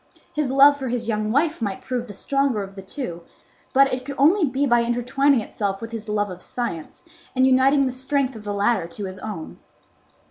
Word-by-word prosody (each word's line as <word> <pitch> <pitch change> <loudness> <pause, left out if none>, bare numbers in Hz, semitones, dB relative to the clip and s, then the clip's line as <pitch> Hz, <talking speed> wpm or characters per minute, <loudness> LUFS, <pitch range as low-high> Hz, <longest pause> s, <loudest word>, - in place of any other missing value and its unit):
His 300 -3 -1
love 280 +2 +6
for 265 -2 -4
his 240 -2 -2
young 215 -1 -1
wife 300 +3 +1
might 200 -3 -3
prove 245 -1 -3
the 205 - -8
stronger 275 0 0
of 195 0 -9
the 195 - -7
two; 190 -4 -6 0.5
but 275 0 +4
it 255 0 -2
could 280 +1 -6
only 325 +7 +4
be 270 +1 0
by 240 -3 +4
intertwining 245 +3 +2
itself 200 -2 -3
with 230 0 -7
his 220 -2 -6
love 205 -2 0
of 180 0 -9
science, 230 -11 -5 0.3
and 260 0 +4
uniting 265 +2 +4
the 260 - -1
strength 265 0 -1
of 215 - -9
the 205 - -4
latter 200 -2 +1
to 200 +4 -7
his 190 0 -7
own. 195 -7 -7
245 Hz, 210 wpm, -23 LUFS, 205-275 Hz, 0.5 s, love